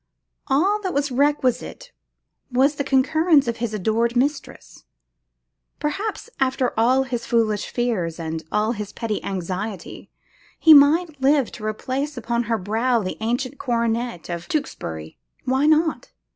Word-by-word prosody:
All 380 +10 +2
that 375 -5 -3
was 285 -1 0
requisite 285 - 0 0.6
was 265 +4 +3
the 280 - -3
concurrence 285 +2 +3
of 235 -1 -2
his 235 -1 -3
adored 220 +3 0
mistress. 275 +4 -3 0.9
Perhaps, 395 +12 -3
after 260 -1 +1
all 250 +4 +3
his 240 -3 -4
foolish 220 -3 +1
fears 195 -10 -2
and 160 -1 -4
all 210 +2 +1
his 210 -3 -5
petty 220 -2 -3
anxiety, 190 +1 -5 0.5
he 320 - +7
might 300 +1 +5
live 275 -2 +3
to 215 - -10
replace 260 +7 -3
upon 235 0 -1
her 230 -1 0
brow 225 +4 0
the 185 - -4
ancient 245 +5 -2
coronet 235 - -1
of 175 0 -5
Tewkesbury! 80 - -4 0.3
Why 265 +3 +2
not? 315 +1 +1
245 Hz, 135 wpm, -22 LUFS, 220-285 Hz, 0.9 s, he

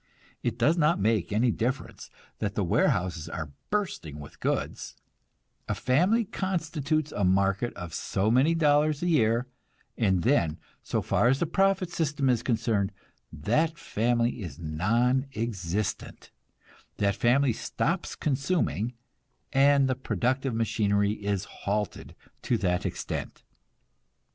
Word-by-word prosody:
It - - -2
does 165 +3 +3
not 150 +2 +3
make 105 -2 +1
any 115 +4 +3
difference 125 +5 -3 0.3
that - - -2
the - - +1
warehouses 85 -3 +1
are 80 -4 -5 0.2
bursting 180 - -2
with 75 - -11
goods; - - -2 0.7
a - - 0
family 185 - +2
constitutes 165 -6 -1
a 100 - -2
market 95 +5 +2
of 85 -3 -7
so 100 +4 0
many 135 +7 +4
dollars 150 -1 +3
a - - +1
year, 120 -7 +3 0.5
and 95 -6 +1
then, 85 - +2 0.2
so - - -2
far - - +2
as 130 +2 +4
the 170 - 0
profit 190 +1 +1
system 150 -5 0
is 120 -2 +1
concerned, 110 -4 0 0.4
that 160 - 0
family 120 -2 0
is 85 -8 -7
non 115 - +1
existent; 105 -3 -3 0.7
that 100 -1 +1
family 125 +3 +3
stops - - -2
consuming, 130 - 0 0.6
and 140 0 +5
the 130 - +2
productive 130 0 -1
machinery 105 -2 +1
is 100 -2 -2
halted 105 +1 -4 0.3
to 120 - +1
that 95 -1 0
extent. 90 - -5
120 Hz, 130 wpm, -28 LUFS, 100-145 Hz, 0.7 s, and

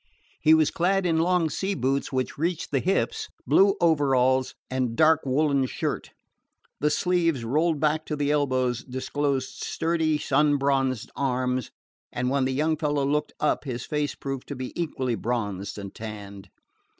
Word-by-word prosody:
He 155 +1 +6
was 155 -2 +3
clad 190 +2 +1
in 165 -2 +2
long 175 0 +2
sea 195 +1 -2
boots 135 +3 -1
which 130 -1 -2
reached 165 +2 -2
the 140 - +2
hips, 430 - 0 0.2
blue 195 0 +5
overalls, 130 -5 +2
and 130 -3 -1
dark 160 +3 +4
woolen 140 0 +2
shirt. - - -3 0.7
The 150 - +2
sleeves, 165 -6 +1
rolled 155 +5 +1
back 155 +1 0
to 150 - -2
the 145 0 0
elbows, 130 -4 +1
disclosed 135 +1 -2
sturdy, 160 -2 0
sun 150 0 +2
bronzed 135 -3 0
arms, 130 -2 -1 0.4
and 125 +1 -1
when 135 -1 +2
the 130 - 0
young 155 +3 +1
fellow 145 -2 0
looked 150 +2 0
up 150 - +1
his 125 -2 -4
face 150 -1 -2
proved 135 -2 -5
to 145 - -5
be 130 0 -6
equally 135 -7 -2
bronzed 105 -5 -3
and 100 -1 -7
tanned. 100 -3 -8
140 Hz, 160 wpm, -26 LUFS, 130-155 Hz, 0.7 s, He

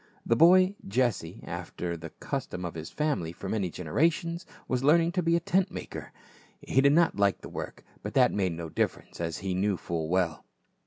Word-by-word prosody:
The 115 - +3
boy, 185 - +6
Jesse, 105 -6 0
after 85 -1 -4
the 80 0 -8
custom 90 +3 -5
of 85 - -4
his 80 0 -6
family 145 - -1
for 90 +3 -8
many 100 -2 -1
generations, 165 - 0 0.2
was 130 0 -1
learning 165 +4 +5
to 180 - 0
be 165 0 +2
a - - +3
tent 185 +3 +1
maker. 180 - -7 0.5
He 135 - +2
did 140 +1 +5
not 170 -5 +3
like 100 -1 +2
the - - -9
work, - - -7 0.2
but - - -6
that - - +5
made 95 -4 0
no 85 0 -5
difference, 80 - -2
as 80 -2 -2
he 95 - 0
knew 95 +1 +1
full 80 -1 -3
well. 85 -3 0
100 Hz, 195 wpm, -28 LUFS, -, 0.5 s, boy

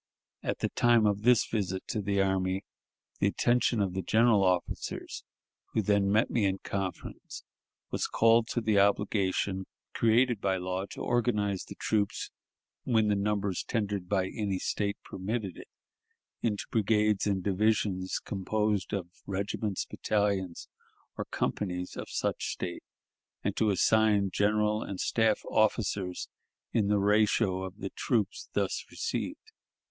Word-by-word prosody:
At - - -2
the - - +1
time 120 -2 +4
of 105 -1 +1
this 120 +1 +5
visit 95 -4 -2
to 110 - -1
the 100 0 0
army, 95 0 0 0.6
the - - +3
attention 120 -1 +2
of 95 -3 0
the 95 - -1
general 110 +2 +4
officers, 90 -2 -1 0.5
who 110 - +1
then 100 0 +2
met 110 +2 +3
me 115 - +1
in 95 0 +1
conference, 95 -2 -5 0.5
was - - -1
called 115 0 +4
to 120 - -1
the 110 -2 +3
obligation 100 -1 +1 0.3
created 115 0 +3
by 95 -1 +1
law 95 +1 -3
to - - -8
organize 105 -5 0
the - - -9
troops, 105 -2 -1 0.5
when 110 -3 +2
the 105 - +3
numbers 100 -1 -1
tendered 100 -5 -2
by 95 -2 +1
any 100 -3 -2
State 100 +2 -1
permitted 100 -1 -3
it, - - -11 0.7
into 105 -3 -1
brigades 105 -2 +2
and 95 -2 0
divisions 100 -2 +1
composed 105 +1 -1
of 100 -3 -1
the 90 - -29
regiments, 100 +1 -2
battalions, 100 -4 -1 0.5
or - - -4
companies 90 -3 -2
of - - -6
such - - -1
State, 85 -1 -4 0.6
and - - -1
to 110 - +2
assign 105 0 +3
general 105 +1 +2
and 95 -4 -5
staff 110 -2 +2
officers 100 -4 +1 0.5
in 105 -3 +2
the 105 0 +3
ratio 105 -1 +3
of 95 +1 -6
the 95 -2 -5
troops 110 -6 -1
thus - - 0
received. - - -4
100 Hz, 140 wpm, -30 LUFS, 95-110 Hz, 0.7 s, this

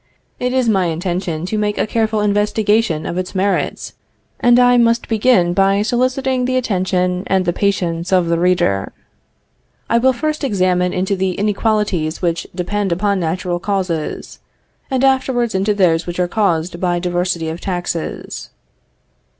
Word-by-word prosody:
It 250 0 -1
is 255 -2 +1
my 195 -4 +2
intention 175 0 -3
to 215 +3 -2
make 210 0 -1
a - - +1
careful 220 -1 0
investigation 210 -3 +1
of 175 - -3
its 185 +1 -5
merits, 195 +2 -1 0.5
and 240 0 +5
I 245 0 +5
must 235 0 +2
begin 215 -6 +3
by 195 +2 +2
soliciting 255 +2 0
the 255 0 0
attention 185 -5 0
and 190 -1 +1
the 175 - +1
patience 175 -4 -1
of 185 -2 +3
the 170 0 0
reader. 175 - +1 1.0
I 235 - +4
will 260 +2 +4
first 305 +5 -3
examine 185 -6 +1
into 190 +2 -1
the 190 -1 -1
inequalities 205 -5 0
which 170 -2 -1
depend 195 +2 -2
upon 200 +3 +1
natural 175 +1 -2
causes, 185 -5 -3 0.5
and 265 -1 0
afterwards 260 -3 +1
into 195 +2 +1
those 175 -4 +2
which 175 +1 -5
are 180 - +2
caused 175 -4 0
by 175 -1 0
diversity 175 -2 -1
of 165 +2 -6
taxes. 175 -3 -4
190 Hz, 150 wpm, -18 LUFS, 175-220 Hz, 1.0 s, and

